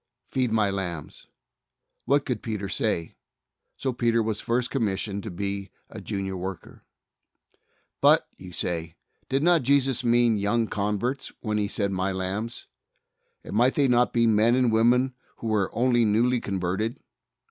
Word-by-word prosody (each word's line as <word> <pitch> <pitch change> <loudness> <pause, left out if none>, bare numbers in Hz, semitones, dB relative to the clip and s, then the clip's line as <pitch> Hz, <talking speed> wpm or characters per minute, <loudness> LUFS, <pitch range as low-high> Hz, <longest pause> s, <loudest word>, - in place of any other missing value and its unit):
"Feed 130 -3 -1
My 105 -3 +2
lambs," 90 -5 -5 0.8
what 140 +3 +2
could 125 -5 -2
Peter 105 -3 -3
say? 95 -4 -1 0.6
So 130 -2 -2
Peter 115 -1 +2
was 110 -1 -2
first 120 +1 0
commissioned 100 -4 -1
to - - -6
be 100 +2 -4 0.2
a - - -8
Junior 95 -2 -3
worker. 95 0 -7 1.2
"But," - - +5
you 90 -1 -11
say, 85 -2 -3 0.3
"did 135 +2 +1
not 175 -1 +4
Jesus 135 -1 +2
mean 120 -2 +3
young 115 +3 +1
converts, 105 +6 -2
when 105 -2 -1
He 105 - 0
said, 100 -1 -1
*My 95 0 -1
lambs'? 100 +5 -4 0.8
and - - -7
might 125 +4 +3
they 140 -2 +3
not 125 0 +3
be 115 -1 +3
men 115 +2 +4
and 125 -2 +3
women 125 +3 +3 0.2
who - - -10
were 105 -3 +1
only 120 0 +2
newly 120 +4 +2
converted?" 95 +4 -2
110 Hz, 150 wpm, -26 LUFS, 100-120 Hz, 1.2 s, But